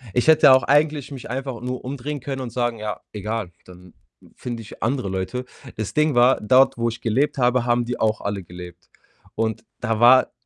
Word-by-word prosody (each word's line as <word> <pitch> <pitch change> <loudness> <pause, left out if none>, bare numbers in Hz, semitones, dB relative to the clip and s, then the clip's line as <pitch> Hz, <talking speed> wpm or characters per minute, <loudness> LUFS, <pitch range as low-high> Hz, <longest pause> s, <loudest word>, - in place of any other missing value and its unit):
Ich 125 - +1
hätte 155 -4 +7
auch 130 - +6
eigentlich 145 -1 +1
mich 130 -4 -8
einfach 130 -1 -5
nur 125 0 -5
umdrehen 140 +2 -5
können 135 0 -5
und 125 - -5
sagen: 120 -1 -2
„Ja, 105 -1 -4
egal, 105 -2 -4
dann 90 -1 -15 0.4
finde 120 -2 -6
ich - - -13
andere 125 -1 -1
Leute.“ 95 +7 -4 0.3
Das 110 -2 -5
Ding 150 -2 +2
war, 125 +2 +4
dort, 130 +2 +4
wo 115 - +1
ich 115 0 -7
gelebt 135 +6 0
habe, 125 -1 +2
haben 120 0 +1
die 125 - -4
auch 110 0 0
alle 100 -1 -3
gelebt. 90 0 -12 0.5
Und 110 0 -2 0.2
da 110 -1 -2
war 125 +2 +6
120 Hz, 195 wpm, -22 LUFS, 110-130 Hz, 0.5 s, hätte